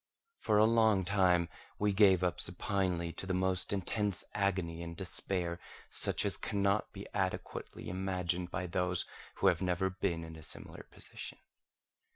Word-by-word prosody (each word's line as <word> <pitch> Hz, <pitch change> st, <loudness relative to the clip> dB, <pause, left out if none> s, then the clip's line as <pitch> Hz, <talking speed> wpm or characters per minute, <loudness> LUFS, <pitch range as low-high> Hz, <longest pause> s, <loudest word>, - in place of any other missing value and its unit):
For 105 Hz, -, +2 dB
a 105 Hz, -, +7 dB
long 110 Hz, -4 st, +4 dB
time 90 Hz, -3 st, +3 dB, 0.3 s
we 105 Hz, -1 st, +2 dB
gave 95 Hz, -2 st, +6 dB
up 90 Hz, -, +1 dB
supinely 90 Hz, -2 st, 0 dB
to 95 Hz, -, -7 dB
the 95 Hz, -, 0 dB
most 95 Hz, 0 st, 0 dB
intense 100 Hz, 0 st, +1 dB
agony 95 Hz, -4 st, 0 dB
and 85 Hz, -1 st, -6 dB
despair, 90 Hz, -2 st, -1 dB, 0.3 s
such -, -, +1 dB
as 100 Hz, -, 0 dB
cannot 100 Hz, 0 st, 0 dB
be 100 Hz, 0 st, -8 dB
adequately 95 Hz, -2 st, -3 dB
imagined 90 Hz, -1 st, -1 dB
by 90 Hz, -, -3 dB
those 90 Hz, 0 st, 0 dB, 0.3 s
who -, -, -2 dB
have -, -, +5 dB
never 95 Hz, +1 st, +1 dB
been 85 Hz, -3 st, -1 dB
in 80 Hz, 0 st, -8 dB
a 80 Hz, -, -10 dB
similar -, -, -7 dB
position. -, -, -8 dB
95 Hz, 155 wpm, -33 LUFS, 90-100 Hz, 0.3 s, a